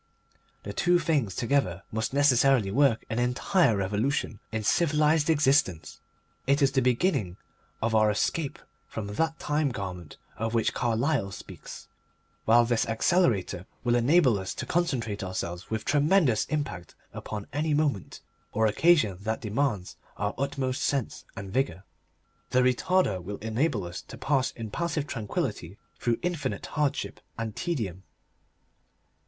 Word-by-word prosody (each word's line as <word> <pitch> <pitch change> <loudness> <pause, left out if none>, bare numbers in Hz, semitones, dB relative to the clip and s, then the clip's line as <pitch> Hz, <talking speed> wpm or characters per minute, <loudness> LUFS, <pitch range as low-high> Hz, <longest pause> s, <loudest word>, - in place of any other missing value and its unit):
The 100 - -6
two 175 +10 +3
things 150 - 0
together 115 -8 0
must 110 +1 -2
necessarily 135 -6 +4
work 135 -1 +3
an 115 0 -2
entire 125 - +2
revolution 105 +4 -1
in 110 -1 -2
civilised 150 +3 +3
existence. 140 - +2 0.5
It 140 +1 +3
is 140 -2 +3
the 135 - +2
beginning 120 - +1 0.5
of 115 0 +1
our 110 -1 +4
escape 140 +8 -1 0.3
from 110 - -5
that 160 +11 -1
Time 150 0 0
Garment 90 - -6 0.2
of 115 +2 -2
which 115 - +2
Carlyle 120 -1 0
speaks. - - -10 0.6
While 120 +2 +6
this 115 -1 +1
Accelerator 110 - +1 0.2
will 120 -1 +2
enable 125 - +4
us 95 - -5
to - - -4
concentrate 120 - -1
ourselves 90 -1 -4
with 110 -1 -3
tremendous 145 - +3
impact 105 - -4 0.2
upon 105 -2 -6
any 150 +1 +1
moment 145 - -1 0.3
or 110 +1 +2
occasion 110 - +3
that 110 +2 -2
demands 105 -4 -1 0.2
our 105 +1 -1
utmost 135 -2 -2
sense 140 -5 -1
and 100 -1 -7
vigour, 95 -9 0 0.7
the 125 0 +3
Retarder 125 - +2
will 100 +3 -5
enable 110 - -1
us 85 +2 -6
to - - -11
pass 135 -3 +1
in 110 -2 -7
passive 165 -1 -1
tranquillity 105 - -3 0.2
through 120 -1 +1
infinite 165 -7 -2
hardship 150 -3 -1 0.2
and 115 -2 -4
tedium. 110 - -3
120 Hz, 135 wpm, -27 LUFS, 105-145 Hz, 0.7 s, While